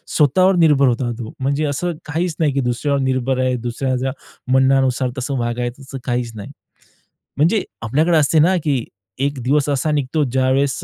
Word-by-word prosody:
स्वतःवर 185 +6 +4
निर्भर 150 -5 +4
होता 120 0 0
तो. 115 -2 -7
म्हणजे 140 +3 0
असं 150 +5 -1
काहीच 160 +2 -2
नाही 150 -4 +2
की 140 - 0
दुसऱ्यावर 130 +4 -1
निर्भर 130 0 0
आहे, 130 -1 +1
दुसऱ्याच्या 130 +2 -2 0.4
म्हणण्यानुसार 130 -1 +3
तसं 135 +1 -2
वागायचं 120 +2 -3
तसं 135 0 -8
काहीच 120 -2 -1
नाही. 100 - -8 0.9
म्हणजे 175 +8 +2 0.2
आपल्याकडे 155 +8 +2
असते 155 +1 +3
ना 180 +5 +4
की 135 -5 0 0.4
एक 140 0 -1
दिवस 145 +2 +1
असा 145 +2 0
निघतो 145 +1 0
ज्यावेळेस 130 +1 0
135 Hz, 160 wpm, -19 LUFS, 125-150 Hz, 0.9 s, स्वतःवर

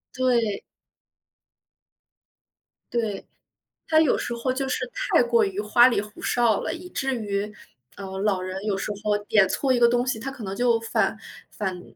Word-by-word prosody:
对。 235 -5 +1 2.3
对， 220 -4 -2 0.6
他 315 - +4
有 315 -3 +3
时 240 - -3
候 235 +2 -1
就 270 +1 -2
是 255 -1 -2
太 - - +2
过 235 -1 +3
于 195 -1 -2
花 225 +4 +5
里 235 - +1
胡 210 +1 -12
哨 235 -4 +2
了， - - -3
以 360 +1 -9
至 270 -6 -2
于， 210 -2 -3 0.4
呃， 190 -1 -7
老 195 -2 +1
人 185 +1 -5
有 205 -3 0
时 195 - -3
候 210 -1 +2
点 210 -2 +4
错 260 +7 +1
一 245 - +2
个 235 - +6
东 245 +1 +1
西， 250 -3 -1
他 265 +4 -5
可 265 -4 -10
能 195 -1 -4
就 235 0 +2
返 225 - 0 0.3
返 190 -3 -4
225 Hz, 185 characters per minute, -24 LUFS, 205-250 Hz, 2.3 s, 个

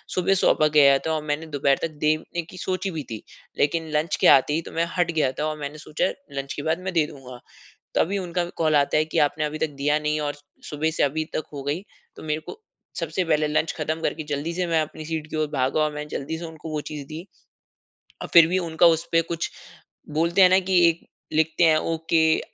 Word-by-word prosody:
सुबह 185 +1 +2
सौंपा 155 -4 +3
गया 140 -2 +6
था 160 - 0
और 155 -1 -2
मैंने 150 +1 -2
दोपहर 140 -2 +1
तक 165 - -2
देने 155 +3 0
कि 180 +3 -13
सोची 185 +1 -2
भी 160 -3 -4
थी, 110 - -6 0.4
लेकिन 160 +2 +1
लंच 155 +2 +1
के - - +6
आते 135 +2 +6
ही 165 - 0
तो - - -11
मैं 165 +1 0
हट 175 -1 +2
गया 150 -5 +1
था 150 - 0
औ 155 - -1
मैंने 145 0 -6
सोचा 155 - -2 0.3
लंच 135 0 -3
के 145 - -5
बाद 160 +2 0
मैं 190 0 -3
दे 160 -3 +3
दूँगा। 130 -4 -11 0.6
तभी 200 +4 +2
उनका 175 -1 -2
कॉल 155 -2 +2
आता 140 0 +2
है 155 - +3
कि 160 - -2
आपने 150 +1 +2
अभी 150 +1 -3
तक 160 - 0
दिया 150 +1 +2
नहीं 150 0 -1
और 145 -1 -2 0.3
सुबह 155 +2 -1
से 160 - -1
अभी 155 +3 +1
तक 155 - -1
हो 140 -2 -6
गई 145 +6 -2 0.3
तो - - -10
मेरे 155 0 -2
को - - -8 0.4
सबसे 185 - -1
पहले 155 -2 +1
लंच 155 +1 0
ख़त्म 155 +1 -2
करके 155 - -1
जल्दी 145 +4 -2
से 180 +1 -1
मैं 165 -2 +2
अपनी 155 +1 -8
सीट 160 -1 -4
की - - -4
ओर 155 - +1
भागा 135 +3 +1
और 150 0 0
मैं 150 0 -5
जल्दी 150 +3 -4
से 170 - -7
उनको 160 -1 -8
वो 150 -1 -2
चीज़ 145 -2 -6
दी। 160 +4 -8 1.0
और - - -5
फिर 170 -2 +9
भी 185 +2 +1
उनका 170 -1 +2
उसपे 165 0 +3
कुछ 165 - -2 0.7
बोलते 170 +4 +3
हैं 185 - +8
ना 185 - +5
कि 185 -2 +5
एक 170 +1 -4 0.3
लिखते 160 +2 +2
हैं 160 -2 +5
ओके, 160 0 +2
155 Hz, 235 wpm, -24 LUFS, 150-165 Hz, 1.0 s, फिर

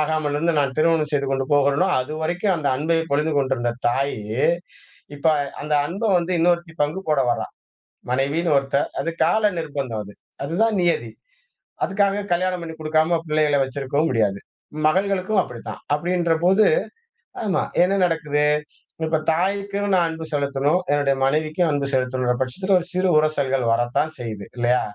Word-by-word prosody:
ஆகாமலிருந்து 155 +1 0
நான் 135 -2 0
திருமணம் 160 -1 +2
செய்து 140 -1 +1
கொண்டு 135 -1 -1
போகிறேனோ 140 +5 +3
அதுவரைக்கும் 160 +7 -1
அந்த 150 -3 -1
அன்பை 165 +3 +1
பொழிந்து 150 +2 +1
கொண்டிருந்த 130 -4 0 0.2
தாயி, 135 +1 -1 1.0
இப்ப 140 - -3 0.4
அந்த 150 0 -1
அன்ப 190 +8 -6 0.2
வந்து 175 +1 -2
இன்னொருத்தி 170 -1 +1
பங்கு 150 +6 -1
போட 150 -3 +3
வரா. - - -1 0.7
மனைவின்னு 145 +5 +1
ஒருத்த 135 0 0 0.2
அது 165 - -2
கால 210 +5 +3
நிர்பந்தம் 140 -8 -4
அது. 100 - -12 0.3
அதுதான் 210 +7 +1
நியதி. 140 -10 0 0.7
அதுக்காக 200 +1 0
கல்யாணம் 180 0 0
பண்ணி 160 -1 -7
குடுக்காம 155 +2 +1
பிள்ளைகளை 150 -2 +2
வச்சிருக்கவும் 140 +3 -1
முடியாது. 105 -4 +1 0.5
மகள்களுக்கும் 190 +3 +1
அப்படித்தான். 120 -2 -8
அப்படின்றபோது 175 +4 +2 0.8
ஆமா. 200 -4 0 0.2
என்ன 185 +2 +3
நடக்குது? 150 -3 0 0.6
இப்ப 160 0 +1
தாய்க்கும் 200 +3 -1
நான் 175 -2 +3
அன்பு 160 0 -6
செலுத்தணும், 140 +4 +1
என்னுடைய 140 -2 +2
மனைவிக்கும் 155 +4 +1
அன்பு 140 -1 0
செலுத்தணும்ன்ற 125 -1 0
பட்சத்தில 185 +10 0
ஒரு 175 - -6
சிறு 185 +1 +1
உரசல்கள் 140 -4 +1
வரத்தான் 120 +6 +1
செய்யுது, 110 -5 -6
இல்லையா? 120 +1 +2
155 Hz, 135 wpm, -22 LUFS, 140-175 Hz, 1.0 s, போகிறேனோ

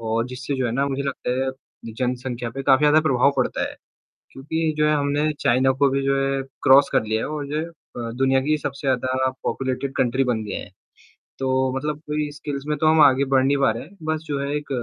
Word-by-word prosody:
और 115 +1 -1
जिससे 130 +3 -4
जो 130 -2 0
है 115 - -2
ना 135 +3 +1
मुझे 140 0 -2
लगता 140 -2 -3
है 130 - -1 0.5
जनसंख्या 125 -1 -2
पे 135 +3 -6
काफ़ी 135 +1 +4
ज़्यादा 150 +1 +5
प्रभाव 140 -3 +3
पड़ता - - 0
है। - - -12 0.6
क्योंकि 160 +4 -2
जो 150 - +3
है 150 - +3
हमने 145 +1 +1
चाइना 130 +2 +3
को 140 -1 +5
भी 135 +1 0
जो 135 0 +1
है 135 0 0 0.2
क्रॉस 135 +2 +6
कर - - +3
लिया 110 +1 -1
है - - -2
और 150 -1 -4
जो 150 +2 -3
है - - -1
अ, 125 -8 -9
दुनिया 135 +1 +3
की 155 +3 +1
सबसे 140 -1 -5
ज़्यादा 130 0 +1
पॉपुलेटेड 135 +1 -2
कंट्री 130 +2 +2
बन 120 -4 -1
गए 105 -2 -5
है, - - -6 0.7
तो 130 0 +1
मतलब 150 +2 -2
कोई 150 0 -2
स्किल्स 145 -2 -5
में 150 0 -1
तो 155 - +1
हम 155 0 +5
आगे 140 -1 +5
बढ़ 130 -1 +5
नहीं 140 +1 +3
पा 135 -4 +3
रहे 115 - -4
हैं, 190 +7 -18
बस 155 0 -1
जो 145 -2 -2
है 140 - -2
एक 150 - -5
135 Hz, 235 wpm, -23 LUFS, 130-150 Hz, 0.7 s, क्रॉस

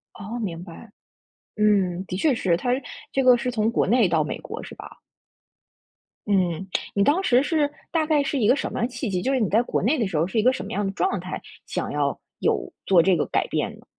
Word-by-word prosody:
哦， 215 +4 -6
明 175 -6 -4
白， 195 +5 -12 0.7
嗯， 195 -4 +2
的 180 - -4
确 280 +8 +2
是。 180 -7 +1
它 245 - -2 0.4
这 270 - +1
个 250 -1 +7
是 250 +1 -2
从 225 -1 +1
国 - - +1
内 230 -1 +4
到 160 -2 +2
美 - - -4
国 - - -7
是 - - -9
吧？ - - -10 1.4
嗯， 190 -3 0 0.3
你 200 - +2
当 300 - +3
时 255 -7 +4
是 295 -1 +1 0.2
大 320 -2 +1
概 305 -2 +3
是 280 0 -1
一 220 - +2
个 250 - +6
什 285 - -3
么 - - -3
样 230 - +1
的 250 - -10
契 240 -1 -3
机， 180 -1 -1
就 265 - 0
是 260 - +1
你 215 - +2
在 220 +4 +3
国 - - -2
内 275 +9 +2
的 225 - +1
时 180 - -3
候 160 +3 +2
是 220 - -2
一 215 - +4
个 255 - +5
什 225 - -5
么 205 - -7
样 205 -2 -1
的 195 - -2
状 385 - 0
态， - - -6 0.3
想 - - -3
要 - - 0 0.2
有 - - 0
做 180 -3 +5
这 185 +1 +3
个 155 - 0
改 - - 0
变 - - -1
呢？ - - -20
220 Hz, 265 characters per minute, -24 LUFS, 190-255 Hz, 1.4 s, 个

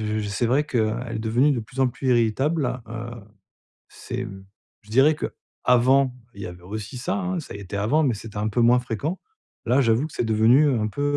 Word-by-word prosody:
heu, 110 0 -1
c'est 105 +3 -1
vrai 135 +5 +2
qu'elle 115 -3 -1
est 110 - -3
devenue 120 +6 +2
de 125 - -1
plus 125 +4 -7
en 130 - +4
plus 130 +2 -4
irritable, 125 +3 +1
heu, 115 +1 -6 0.8
c'est, 125 0 -6
mmh, 95 -3 -10 0.4
je 105 - -17
dirais 140 +6 +5
qu'avant, 130 -2 +1 0.2
il 100 - -10
y - - -4
avait 90 0 -10
aussi 105 +6 -6
ça 180 +11 -2
hein, 185 -2 -2
ça 155 - -8
y 100 - -7
était 100 +1 -6
avant, 130 +11 +2
mais 130 - +2
c'était 105 0 -8
un 105 +1 0
peu 115 - -1
moins 120 +1 +5
fréquent. 125 - -3 0.5
Là, 125 +4 +3
j'avoue 115 +4 +2
que 155 - -16
c'est - - -1
devenu, 115 +6 +5
heu, 135 -4 +2
un 110 - 0
peu, 145 +7 -4
120 Hz, 220 wpm, -24 LUFS, 110-135 Hz, 0.8 s, dirais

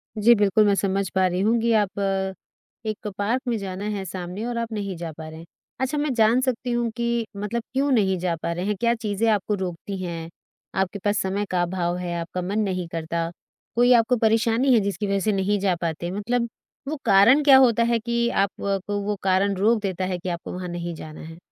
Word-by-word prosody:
जी, 220 +2 +6
बिल्कुल 210 0 +3
मैं 200 -1 +4
समझ 195 -1 0
पा 190 0 +4
रही 180 0 -1
हूँ 225 +4 +3
कि 235 +1 +2
आप 200 -1 -2 0.9
एक 215 -1 -4
पार्क 225 +6 0
में 235 -2 +1
जाना 195 -1 -5
है 195 - -3
सामने 185 +4 -5
और 240 -1 -3
आप 230 0 -3
नहीं 200 -3 -3
जा 165 -1 -5
पा 160 0 -7
रहे 160 0 -10
हैं। 165 - -11 0.3
अच्छा, 265 +3 -1
मैं 295 -2 0
जान 225 +1 +4
सकती 255 -1 -1
हूँ 240 -1 0
कि 235 -1 0
मतलब 215 +3 -3
क्यों 275 +2 +1
नहीं 195 -6 +3
जा 175 -1 0
पा 165 +1 -4
रहे 175 +2 -3
हैं? 210 +1 0
क्या 235 0 +3
चीजें 220 -1 -1
आपको 210 -1 +1
रोकती 190 +1 -5
हैं? 165 -2 -5 0.5
आपके 190 +1 -1
पास 205 +2 0
समय 195 +2 -1
का 180 -1 +1
अभाव 175 0 -1
है, 180 -1 -4
आपका 170 +2 -4
मन 195 +4 -2
नहीं 185 -4 -1
करता। 165 0 -2 0.5
कोई 245 +1 +5
आपको 235 +1 +4
परेशानी 230 +3 +3
है 235 - +6
जिसकी 200 +1 -2
वजह 200 0 +1
से 215 +3 +1
नहीं 200 +1 +1
जा 190 -2 +1
पाते। 170 +1 -2
मतलब 235 +5 -1 0.4
वो 305 - -2
कारण 230 +10 +6
क्या 275 -2 +8
होता 235 -3 +5
है 235 0 +2
कि 235 +1 0
आपको 200 -1 -1
वो 205 +1 -1
कारण 195 +1 +2
रोक 215 +4 +2
देता 190 -2 -2
है 185 -1 -2
कि 180 - -4
आपको 170 -1 -5
वहाँ 180 0 -5
नहीं 175 0 -4
जाना 155 -1 -9
है? 160 +1 -10
200 Hz, 220 wpm, -24 LUFS, 185-230 Hz, 0.9 s, क्या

